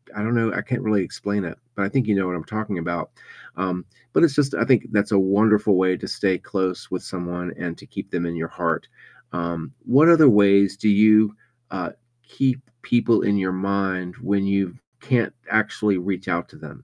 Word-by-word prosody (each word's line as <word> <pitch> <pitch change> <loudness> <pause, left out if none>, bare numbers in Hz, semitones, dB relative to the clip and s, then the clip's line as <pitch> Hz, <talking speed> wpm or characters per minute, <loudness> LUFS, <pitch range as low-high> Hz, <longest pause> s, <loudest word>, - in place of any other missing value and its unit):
I 105 - -4
don't 115 +2 0
know, 115 -2 +1
I - - -1
can't 125 -1 -3
really 105 -4 +1
explain 100 +2 -3
it, 85 +5 -7 0.2
but 100 - -1
I 100 - 0
think 130 -3 0
you 105 - +2
know 95 -1 0
what 90 - -3
I'm 80 - -8
talking 110 -3 -4
about. 85 0 -4 0.5
Um, 90 -1 -2 0.3
but - - +4
it's 145 -4 +4
just 140 -2 +1
I - - +1
think 130 -5 +3
that's 100 +1 +1
a 100 - +4
wonderful 105 +1 +3
way 95 0 +2
to - - -7
stay 95 -3 0
close 95 -1 -3
with 90 - -4
someone 90 -1 -5
and 85 -1 -5
to - - -15
keep - - -8
them 85 -1 -2
in 85 0 -4
your 80 +1 -3
heart. 85 -3 -2 0.5
Um, 85 +5 -4
what 145 +6 +5
other 160 -5 +8
ways 100 -2 +4
do 110 - -1
you, 105 +1 +5 0.4
uh, 90 -3 -4 0.3
keep 130 +1 -1 0.2
people 120 -1 +2
in 100 0 +2
your 95 -1 -1
mind 95 -1 -2
when 100 0 0
you 100 -1 0 0.3
can't 125 -4 0 0.2
actually 105 -2 +1
reach 95 +1 -4
out 85 0 -1
to - - -19
them? - - -12
100 Hz, 210 wpm, -22 LUFS, 90-110 Hz, 0.5 s, other